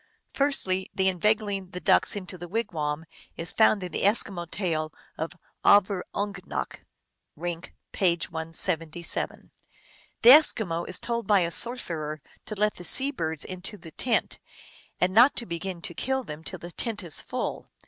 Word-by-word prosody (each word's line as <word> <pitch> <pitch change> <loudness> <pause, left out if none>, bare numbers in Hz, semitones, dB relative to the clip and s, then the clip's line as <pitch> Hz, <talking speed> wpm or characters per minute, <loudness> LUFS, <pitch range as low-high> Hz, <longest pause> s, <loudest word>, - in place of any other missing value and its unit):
Firstly, 190 -10 +2
the 190 0 +2
inveigling 200 0 0
the 180 - -6
ducks - - +4
into 185 -3 -6
the 175 0 -8
wigwam 165 -7 -3 0.3
is 165 - -2
found 215 -3 +4
in 180 - -5
the - - -3
Eskimo 195 -4 0
tale 160 -6 -2 0.2
of 160 +2 -4 0.3
Avurungnak 200 0 +1 0.6
(Rink, 170 +1 -6 0.2
p. 175 -3 +2
177). 165 +1 -2 0.7
The 235 - +9
Eskimo 215 - +4
is 185 - +3
told 235 0 -3
by 205 -3 +4
a 170 -1 -1
sorcerer 165 -8 +1 0.3
to 215 - -5
let 210 +1 0
the 175 - -9
sea 270 +10 +4
birds 160 - -2
into 185 +3 -5
the 165 -3 -12
tent, 240 +5 0 0.6
and 185 +1 +1
not 240 +7 +6
to 235 - -1
begin 170 -1 -5
to - - -2
kill 265 +7 -1
them 150 -6 -9
till 185 - -5
the 175 +1 -10
tent 220 +1 -4
is 165 -4 -1
full. - - -5
185 Hz, 155 wpm, -26 LUFS, 170-210 Hz, 0.7 s, The